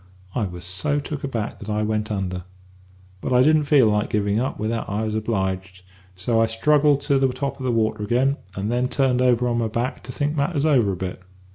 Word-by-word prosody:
I 115 Hz, -, 0 dB
was 90 Hz, -2 st, -7 dB
so 145 Hz, +12 st, 0 dB
took 145 Hz, 0 st, -5 dB
aback 120 Hz, -6 st, -3 dB
that 105 Hz, -, -8 dB
I 105 Hz, 0 st, 0 dB
went 105 Hz, 0 st, -1 dB
under. 95 Hz, -3 st, -3 dB, 0.8 s
But -, -, -1 dB
I 125 Hz, 0 st, +6 dB
didn't 155 Hz, +1 st, +4 dB
feel 140 Hz, -4 st, +5 dB
like 105 Hz, 0 st, +1 dB
giving 105 Hz, 0 st, +1 dB
up 130 Hz, -, -2 dB
without 115 Hz, +2 st, -2 dB
I 105 Hz, +2 st, -1 dB
was 110 Hz, -1 st, -2 dB
obliged; 95 Hz, -4 st, -2 dB, 0.3 s
so 115 Hz, +5 st, +1 dB
I 115 Hz, -, +3 dB
struggled 145 Hz, +5 st, +3 dB
to 140 Hz, -3 st, +2 dB
the 135 Hz, -, +3 dB
top 140 Hz, +1 st, -3 dB
of 130 Hz, -, -5 dB
the 125 Hz, -, +1 dB
water 110 Hz, -2 st, 0 dB
again, 125 Hz, +6 st, +1 dB, 0.2 s
and 100 Hz, +3 st, -2 dB
then 125 Hz, +1 st, +1 dB
turned 130 Hz, -3 st, +1 dB
over 125 Hz, -1 st, +3 dB
on 120 Hz, -1 st, 0 dB
my 115 Hz, -, 0 dB
back 115 Hz, +4 st, -2 dB
to -, -, -6 dB
think 145 Hz, +3 st, -1 dB
matters 145 Hz, 0 st, 0 dB
over 125 Hz, -10 st, +3 dB
a -, -, -5 dB
bit. 90 Hz, 0 st, -5 dB
115 Hz, 225 wpm, -23 LUFS, 105-135 Hz, 0.8 s, I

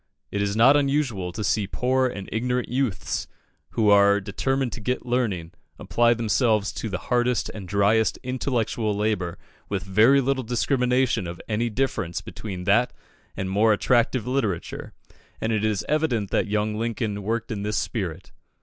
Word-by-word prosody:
It 100 Hz, -, -1 dB
is 100 Hz, 0 st, 0 dB
not 125 Hz, +6 st, +6 dB
unusual 135 Hz, -10 st, 0 dB
to 105 Hz, +4 st, -5 dB
see 105 Hz, -1 st, +1 dB
poor 130 Hz, +4 st, +1 dB
and 100 Hz, -6 st, -6 dB
ignorant 125 Hz, +2 st, -1 dB
youths 125 Hz, -4 st, -1 dB, 0.5 s
who 110 Hz, -2 st, +3 dB
are 100 Hz, 0 st, +6 dB
determined 130 Hz, +6 st, -1 dB
to 115 Hz, -, -6 dB
"get 125 Hz, +3 st, -2 dB
learning," 110 Hz, -10 st, -1 dB, 0.3 s
apply 120 Hz, 0 st, +2 dB
themselves 110 Hz, -2 st, +1 dB
to 110 Hz, -, -5 dB
the 95 Hz, -, -2 dB
hardest 120 Hz, +2 st, 0 dB
and 100 Hz, -4 st, -8 dB
dryest 105 Hz, +3 st, +2 dB
intellectual 120 Hz, -4 st, -1 dB
labour 105 Hz, -5 st, -1 dB, 0.3 s
with 100 Hz, -3 st, -2 dB
very 110 Hz, +9 st, +5 dB
little 135 Hz, 0 st, 0 dB
discrimination 125 Hz, -2 st, +1 dB
of 85 Hz, 0 st, -7 dB
any 115 Hz, +2 st, 0 dB
difference 105 Hz, -8 st, -1 dB
between 95 Hz, -4 st, -7 dB
that 115 Hz, +7 st, +3 dB, 0.4 s
and 95 Hz, -1 st, -3 dB
more 110 Hz, +3 st, +4 dB
attractive 120 Hz, +2 st, +2 dB
literature, 125 Hz, -9 st, -2 dB, 0.4 s
and 110 Hz, +1 st, -1 dB
it 110 Hz, -1 st, 0 dB
is 110 Hz, -3 st, 0 dB
evident 130 Hz, -10 st, 0 dB
that -, -, +1 dB
young 105 Hz, +1 st, -1 dB
Lincoln 115 Hz, -3 st, -2 dB
worked 115 Hz, +3 st, -2 dB
in 105 Hz, -2 st, -3 dB
this 105 Hz, 0 st, -1 dB
spirit. 95 Hz, -5 st, -3 dB
110 Hz, 160 wpm, -24 LUFS, 100-125 Hz, 0.5 s, not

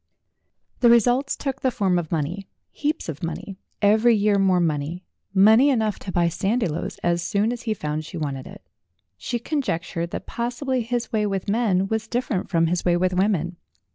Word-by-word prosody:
The 240 Hz, -, +5 dB
results 245 Hz, +4 st, +3 dB
took 270 Hz, -2 st, -4 dB
the 260 Hz, -, +2 dB
form 195 Hz, -7 st, +1 dB
of 160 Hz, -3 st, -6 dB
money 170 Hz, +5 st, -2 dB, 0.2 s
heaps 300 Hz, +2 st, -2 dB
of 160 Hz, -2 st, -6 dB
money, 175 Hz, +4 st, -5 dB, 0.2 s
every 220 Hz, +3 st, +5 dB
year 205 Hz, -1 st, +2 dB
more 190 Hz, -2 st, +3 dB
money 165 Hz, +2 st, -2 dB, 0.3 s
money 220 Hz, +8 st, +6 dB
enough 220 Hz, -6 st, 0 dB
to 190 Hz, -, -6 dB
buy 175 Hz, -1 st, +2 dB
Sandiloes 185 Hz, -1 st, -1 dB
as 170 Hz, 0 st, +1 dB
soon 205 Hz, +6 st, 0 dB
as 245 Hz, -, -7 dB
he 215 Hz, -, +1 dB
found 155 Hz, -3 st, -3 dB
she 175 Hz, -, -8 dB
wanted 140 Hz, -4 st, -4 dB
it. -, -, -12 dB, 0.5 s
She 245 Hz, -, -3 dB
conjectured 175 Hz, -, -2 dB
that 180 Hz, -, -6 dB
possibly 245 Hz, +2 st, -2 dB
his 240 Hz, +1 st, -3 dB
way 215 Hz, -2 st, +1 dB
with 195 Hz, -1 st, -3 dB
men 200 Hz, -4 st, +2 dB
was 220 Hz, +1 st, -2 dB
dif 245 Hz, +2 st, -2 dB
ferent 195 Hz, -8 st, -2 dB
from 165 Hz, -3 st, +2 dB
his 170 Hz, +1 st, 0 dB
way 175 Hz, -1 st, +3 dB
with 185 Hz, +1 st, +1 dB
women. 180 Hz, -3 st, 0 dB
200 Hz, 185 wpm, -23 LUFS, 175-235 Hz, 0.5 s, money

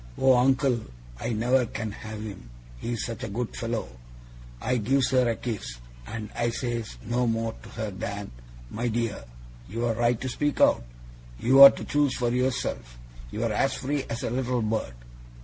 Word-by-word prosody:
Oh, 130 Hz, 0 st, +5 dB
Uncle! 130 Hz, 0 st, +3 dB, 0.4 s
I -, -, -3 dB
never 120 Hz, +2 st, +2 dB
can 110 Hz, -1 st, -4 dB
have 110 Hz, 0 st, -7 dB
him. 95 Hz, -, -8 dB, 0.3 s
He's 115 Hz, -, -3 dB
such 115 Hz, -3 st, -6 dB
a -, -, -3 dB
good 115 Hz, +3 st, -3 dB
fellow!" 115 Hz, -1 st, -2 dB, 0.7 s
I 125 Hz, -, 0 dB
gives 130 Hz, +4 st, +2 dB
her 125 Hz, -2 st, +4 dB
a 115 Hz, -, +1 dB
kiss, 110 Hz, -, -5 dB, 0.3 s
and 110 Hz, -1 st, -6 dB
I 120 Hz, -, +1 dB
says 115 Hz, -, -3 dB
no 120 Hz, +2 st, +1 dB
more 115 Hz, 0 st, 0 dB
to -, -, -12 dB
her 110 Hz, -3 st, -4 dB
than, 100 Hz, 0 st, -5 dB, 0.4 s
"My 120 Hz, +3 st, -2 dB
dear, 115 Hz, -2 st, -1 dB, 0.5 s
you're 115 Hz, +3 st, 0 dB
right 120 Hz, +1 st, +1 dB
to 130 Hz, -, -4 dB
speak 145 Hz, +3 st, -1 dB
out, -, -, +5 dB, 0.6 s
you're 135 Hz, +3 st, +10 dB
to -, -, -6 dB
choose 145 Hz, -3 st, +1 dB
for 120 Hz, -2 st, 0 dB
yourself, 115 Hz, -, -1 dB, 0.3 s
you're 110 Hz, -, -1 dB
as 135 Hz, +5 st, +1 dB
free 140 Hz, +1 st, -2 dB
as 115 Hz, +3 st, -4 dB
a 115 Hz, -, -1 dB
little 125 Hz, -1 st, 0 dB
bird." 110 Hz, -, -2 dB
120 Hz, 170 wpm, -27 LUFS, 110-125 Hz, 0.7 s, you're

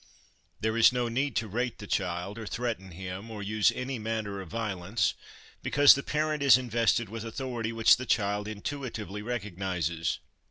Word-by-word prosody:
There 110 Hz, 0 st, 0 dB
is 115 Hz, -, +7 dB
no 125 Hz, -1 st, -1 dB
need 130 Hz, +1 st, -1 dB
to 110 Hz, +2 st, 0 dB
rate 120 Hz, +4 st, -2 dB
the 105 Hz, -, -8 dB
child, 95 Hz, +2 st, -2 dB
or 110 Hz, -, -6 dB
threaten 115 Hz, -6 st, -3 dB
him, 95 Hz, +4 st, -7 dB
or 105 Hz, -2 st, -6 dB
use 105 Hz, 0 st, +3 dB
any 125 Hz, -1 st, -3 dB
manner 110 Hz, -3 st, -3 dB
ot 95 Hz, -, -9 dB
violence, 100 Hz, -1 st, -1 dB, 0.5 s
because 145 Hz, 0 st, +7 dB
the 140 Hz, -, -2 dB
parent 150 Hz, +1 st, -1 dB
is 140 Hz, -3 st, +8 dB
invested 120 Hz, -2 st, +1 dB
with 115 Hz, 0 st, -6 dB
authority 115 Hz, -1 st, -3 dB
which 115 Hz, -1 st, +5 dB
the 130 Hz, 0 st, -6 dB
child 105 Hz, -1 st, +1 dB
intuitively 110 Hz, -3 st, -5 dB
recognises. 95 Hz, -, -2 dB
110 Hz, 165 wpm, -29 LUFS, 100-120 Hz, 0.5 s, is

